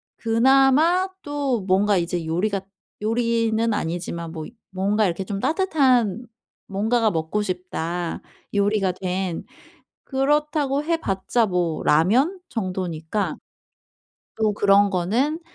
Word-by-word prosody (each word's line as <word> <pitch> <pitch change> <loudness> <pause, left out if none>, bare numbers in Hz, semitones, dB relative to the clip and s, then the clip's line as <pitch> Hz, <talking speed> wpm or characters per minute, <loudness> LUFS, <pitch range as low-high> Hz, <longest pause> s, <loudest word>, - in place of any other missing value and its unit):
그나마 270 +10 +3
또 285 -5 -1
뭔가 195 +2 +2
이제 170 -1 -2
요리가 190 +5 -1 0.4
요리는 230 0 +1
아니지만 170 -2 -3
뭐 160 -2 -6
이 - - -11 0.2
뭔가 200 +3 +1
이렇게 185 +1 -2
좀 195 0 -4
따뜻한 260 - +2 0.4
뭔가가 220 +3 +1
먹고 165 +5 -1
싶다 180 -3 -3 0.3
요리가 200 -2 +1
된. 185 -1 -3 0.6
그렇다고 290 +1 +1
해 335 +1 +1
봤자 195 +1 0
뭐 175 -4 -1
라면 245 - +3
정도니까 185 -2 -3 1.0
또 215 -1 +1
그런 200 0 +4
거는 230 - 0
205 Hz, 230 characters per minute, -23 LUFS, 180-250 Hz, 1.0 s, 그런